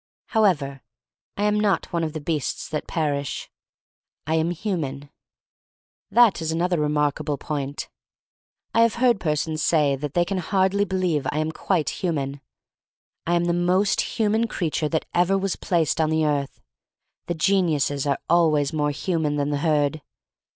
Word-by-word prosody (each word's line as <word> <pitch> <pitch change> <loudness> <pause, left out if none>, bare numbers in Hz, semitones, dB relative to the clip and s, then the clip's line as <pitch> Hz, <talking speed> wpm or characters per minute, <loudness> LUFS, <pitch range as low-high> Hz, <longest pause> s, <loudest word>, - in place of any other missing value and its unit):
However, 155 - +1 0.6
I 205 - -1
am 210 0 +2
not 200 -5 0
one 170 -1 0
of 155 -2 -2
the 155 - -4
beasts 150 -2 -2
that 150 -1 -4
perish. 145 -4 -2 0.7
I 155 - -1
am 160 +1 +2
human. 155 -7 -3 1.0
That 225 -4 +5
is 160 0 -1
another 175 +1 0
remarkable 150 0 0
point. 140 -1 -4 0.9
I 230 - +4
have 230 -1 +3
heard 240 -3 +3
persons 155 -1 -1
say 150 -4 +3
they 150 +5 -1
can 190 +1 -2
hardly 190 +2 +1
believe 180 -6 0
I - - -3
am 155 +1 0
quite 165 -1 0
human. 140 -6 -2 0.9
I 175 - +2
am 175 0 +1
the 170 - +1
most 180 +3 +1
human 220 +1 +2
creature 160 -6 -1
that 160 0 -1
ever 180 +3 +3
was 195 -1 -1
placed 165 -2 0
on 155 - +2
the 160 0 +1
earth. 145 -2 -1 0.7
The 175 - -1
geniuses 155 -6 +1
are 140 - +1
always 155 -4 +3
more 150 -1 +1
human 155 0 -1
than 145 0 -1
the 145 - 0
herd. 150 0 +1
160 Hz, 155 wpm, -24 LUFS, 150-185 Hz, 1.0 s, That